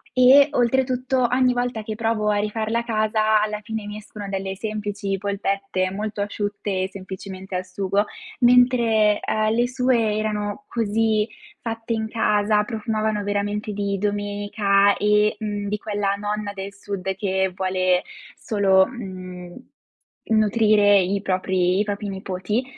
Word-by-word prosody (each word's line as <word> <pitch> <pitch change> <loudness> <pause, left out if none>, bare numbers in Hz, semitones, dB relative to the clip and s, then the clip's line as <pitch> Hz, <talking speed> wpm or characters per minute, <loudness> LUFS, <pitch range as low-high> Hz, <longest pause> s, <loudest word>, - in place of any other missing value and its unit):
e 270 +3 +7
oltretutto 255 0 +1
ogni 250 0 +3
volta 245 -2 -2
che 215 0 -5
provo 225 -1 0
a 205 - +2
rifarla 220 +2 -1
a - - -3
casa 215 -1 +2
alla 210 0 -2
fine 220 -1 -5
mi 210 0 -6
escono 210 -1 -9
delle 195 0 -3
semplici 205 -2 -3
polpette 195 -1 -1
molto 210 +1 -4
asciutte, 205 -2 -2
semplicemente 190 0 -8
al 185 0 -2
sugo, 195 +2 0 0.4
mentre, 240 -4 +4
ehm, 215 0 0
le 240 +1 +2
sue 250 -4 +1
erano 215 +4 -3
così 220 -1 +1 0.3
fatte 225 0 -3
in 220 -1 -2
casa, 210 -2 +2
profumavano 215 -2 -2
veramente 205 +1 -2
di 200 -1 -1
domenica 205 0 +1
e, 210 0 +3
mhmm, 205 -1 -3
di 210 +1 -1
quella 205 -2 -1
nonna 210 0 -3
del 195 0 -6
sud 195 -1 -4
che 190 -1 0
vuole 185 -1 +1 0.3
solo, 195 -3 +3
mhmm, 185 -6 -8 0.7
nutrire 215 -2 +4
i 195 +2 0
propri 185 0 +1
i - - +3
propri 205 0 -4
nipoti, 190 +4 -2
210 Hz, 135 wpm, -23 LUFS, 195-220 Hz, 0.7 s, e